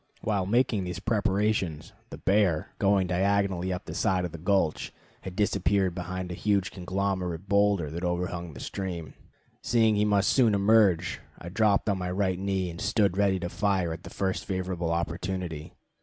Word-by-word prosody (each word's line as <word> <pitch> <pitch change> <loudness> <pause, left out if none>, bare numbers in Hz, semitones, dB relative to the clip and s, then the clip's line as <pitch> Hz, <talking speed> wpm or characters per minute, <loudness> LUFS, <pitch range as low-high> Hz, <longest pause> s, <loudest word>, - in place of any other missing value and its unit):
While 100 -4 0
making 115 -2 +2
these 90 0 -4
preparations, 100 -6 0 0.2
the - - -8
bear, 95 -6 +1
going 100 -1 +3
diagonally 95 0 +1
up 90 - -4
the - - -6
side 90 -1 +1
of 90 - -5
the 85 - -8
gulch, 90 -2 0 0.3
had 95 -1 -7
disappeared 100 -2 +1
behind 90 0 -5
a - - -3
huge 100 0 0
conglomerate 95 -1 -3
boulder 100 -6 +2
that 85 +3 -5
overhung 90 -1 -2
the - - -9
stream. 90 -5 -5 0.5
Seeing 110 -2 +3
he 105 - +2
must 100 -1 +3
soon 115 -6 +4
emerge, 100 -4 +3 0.2
I 85 - -8
dropped 105 +2 +2
on 100 -2 +1
my 90 0 -3
right 95 -1 0
knee 95 -2 -1
and 85 - -9
stood 100 -2 +2
ready 100 -1 +2
to 85 - -3
fire 95 -4 0
at 80 - -8
the - - -10
first 95 -1 -2
favorable 90 -3 -2
opportunity. 85 -1 -3
95 Hz, 170 wpm, -27 LUFS, 90-100 Hz, 0.5 s, soon